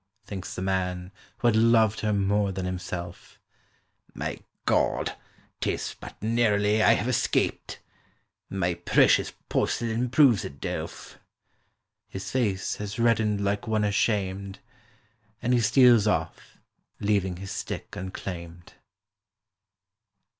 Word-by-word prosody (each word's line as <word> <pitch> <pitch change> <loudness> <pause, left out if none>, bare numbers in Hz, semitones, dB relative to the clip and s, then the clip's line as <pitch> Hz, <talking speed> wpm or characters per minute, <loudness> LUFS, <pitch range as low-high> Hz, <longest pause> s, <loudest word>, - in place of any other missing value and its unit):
Thinks 95 -3 -6
the 90 - -4
man 90 -1 -2 0.3
who - - +1
had 115 - +4
loved 110 -1 +4
her 105 - 0
more 100 0 +1
than 95 -1 -4
himself; 90 -1 -6 0.8
"My - - -4 0.3
God—'tis - - -2
but - - -10
narrowly 110 -2 +2
I - - +6
have - - -1
escaped.— - - 0 0.7
My 90 -2 0
precious 85 +1 +3 0.2
porcelain 115 +2 0
proves 130 -5 +5
it 70 - -8
delf." - - -6 0.9
His 95 0 -6
face 105 -7 0
has 105 0 -5
reddened 110 -3 +2
like 100 +1 -1
one 110 -1 +1
ashamed, 100 -2 0 0.8
And 125 +1 0
he 120 - +3
steals 120 -1 +5
off, 80 -6 -2 0.4
leaving 100 -3 0
his 95 +1 -7
stick - - -5
unclaimed. 85 -2 -7
100 Hz, 110 wpm, -26 LUFS, 95-110 Hz, 0.9 s, I